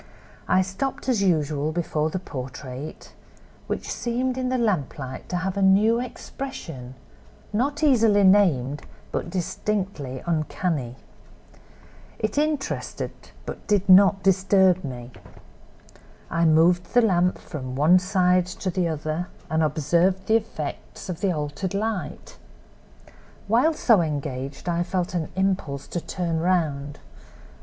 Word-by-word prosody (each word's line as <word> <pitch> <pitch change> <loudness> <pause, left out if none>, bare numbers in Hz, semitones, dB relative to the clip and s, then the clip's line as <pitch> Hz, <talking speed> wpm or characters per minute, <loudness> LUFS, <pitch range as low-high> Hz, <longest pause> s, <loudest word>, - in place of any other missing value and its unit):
I 185 - +4
stopped 225 +11 -4
as 245 -6 +2
usual 155 -5 +1
before 160 -2 -1
the 175 - -3
portrait, 130 -3 -7 0.5
which - - -3
seemed 250 +2 -1
in 255 -1 -1
the 255 - +1
lamplight 150 - -2
to - - -2
have 185 +2 -2
a - - 0
new 205 +4 +4
expression, 170 - -7 0.6
not 285 +7 0
easily 225 -8 +5
named, 150 -9 +4 0.3
but - - -3
distinctly 180 -6 -3
uncanny. 155 -5 -1 1.2
It 215 +6 -1
interested 300 -2 -2 0.3
but - - -8
did 200 -2 +2
not 195 +1 +6
disturb 190 -1 +4
me. 125 -3 -7 1.2
I 165 0 +2
moved 170 +5 +3
the 245 - +6
lamp 180 -4 +2
from 130 -5 -7
one 160 +7 +5
side 180 -1 +2
to 185 +1 -4
the 180 -1 0
other 155 +2 -3 0.2
and 160 0 +2
observed 170 +5 +1
the 220 - +3
effects 175 -6 -6
of 175 -1 -5
the 195 -3 +2
altered 150 +4 -3
light. 210 -1 -4 1.1
While 250 +10 +3
so 225 - +4
engaged 140 -2 -4
I 170 0 +1
felt 180 0 -2
an 170 -3 -2
impulse 190 -8 -1
to 175 - -3
turn 170 -3 -2
round. 150 -5 0
180 Hz, 125 wpm, -24 LUFS, 155-200 Hz, 1.2 s, not